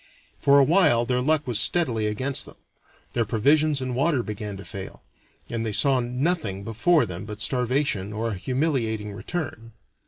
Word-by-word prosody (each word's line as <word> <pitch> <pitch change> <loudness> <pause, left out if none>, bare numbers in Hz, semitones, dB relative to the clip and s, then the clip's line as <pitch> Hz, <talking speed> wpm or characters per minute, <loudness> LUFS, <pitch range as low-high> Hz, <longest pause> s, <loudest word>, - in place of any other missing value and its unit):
For 140 0 +5
a 140 - +7
while 150 -6 +4
their 125 0 0
luck 155 +2 +2
was 120 -5 0
steadily 120 -7 +1
against 130 +7 0
them; - - -13 0.6
their 120 - +1
provisions 145 +7 +2
and 130 -1 -3
water 140 -1 +1
began 105 -2 -5
to 100 - -10
fail, 95 -1 -8 0.4
and 115 -1 -3
they 110 - -2
saw 135 +4 +3
nothing 125 - -1
before 125 - +2
them 90 -3 -6
but 105 0 -8
starvation 125 -3 0
or 110 +2 -2
a - - -3
humiliating 115 - -1
return. 115 - -5
120 Hz, 165 wpm, -25 LUFS, 105-140 Hz, 0.6 s, a